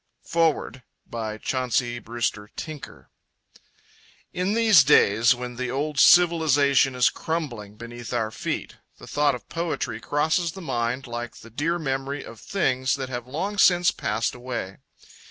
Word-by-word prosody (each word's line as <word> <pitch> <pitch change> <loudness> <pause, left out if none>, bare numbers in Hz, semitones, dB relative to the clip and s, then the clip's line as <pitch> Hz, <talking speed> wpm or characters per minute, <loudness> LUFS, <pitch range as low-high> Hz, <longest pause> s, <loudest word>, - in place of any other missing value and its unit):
Foreword 165 -5 0 0.2
by 110 -2 -5
Chauncey 125 0 -1
Brewster 115 -3 -3
Tinker 155 -3 -9 1.2
In 185 +4 -1
these 220 -9 +6
days 115 -4 +5
when 125 0 -7
the 130 0 -3
old 140 +3 -2
civilisation 145 -6 +5
is 125 -1 +4
crumbling 120 -11 -4
beneath 120 +1 -9
our 115 -3 -1
feet, 110 - -4 0.2
the - - -12
thought 145 -2 +1
of 125 - -11
poetry 170 0 -3
crosses 160 +3 0
the 195 - -9
mind 125 -5 -2
like 120 -1 -6
the 115 - -14
dear 160 +8 -1
memory 135 -2 -3
of 115 - -11
things 130 -8 0
that 135 -2 -5
have 125 -1 -5
long 190 +10 -3
since 175 -2 +5
passed 110 +2 -2
away. 120 -6 -6
130 Hz, 140 wpm, -24 LUFS, 120-160 Hz, 1.2 s, these